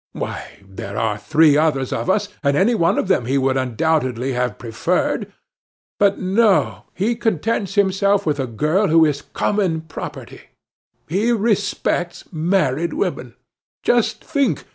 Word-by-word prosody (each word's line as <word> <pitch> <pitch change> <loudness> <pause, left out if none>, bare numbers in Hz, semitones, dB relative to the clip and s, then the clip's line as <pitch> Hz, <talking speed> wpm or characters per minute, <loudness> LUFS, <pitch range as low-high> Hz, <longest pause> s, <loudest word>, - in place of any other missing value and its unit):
Why, - - -6
there 100 +1 -8
were 110 -1 0
three 155 +3 +4
others 145 -4 +1
of - - -3
us, 205 +2 +1 0.2
any 170 +11 +3
one 170 -7 +2
of - - 0
whom 125 -11 +1
he 135 +2 +1
would 135 -1 +1
undoubtedly 130 0 0
have 125 -2 -1
preferred. 115 -3 -1 0.7
But 200 -1 +3
no, 195 +2 +1
he 215 +6 0
contents 220 -2 -1
himself 200 0 +2
with 150 -3 0
the 135 -2 -2
girl 155 - +1
who 160 0 +5
is 145 -2 -1
common 185 -6 -1
property. 160 -1 -8 0.7
He 205 +9 +1
respects 205 -5 -1
married 170 -2 0
women. - - -3 0.5
Just 240 -2 +1
think. 280 -4 0
165 Hz, 140 wpm, -20 LUFS, 135-200 Hz, 0.7 s, who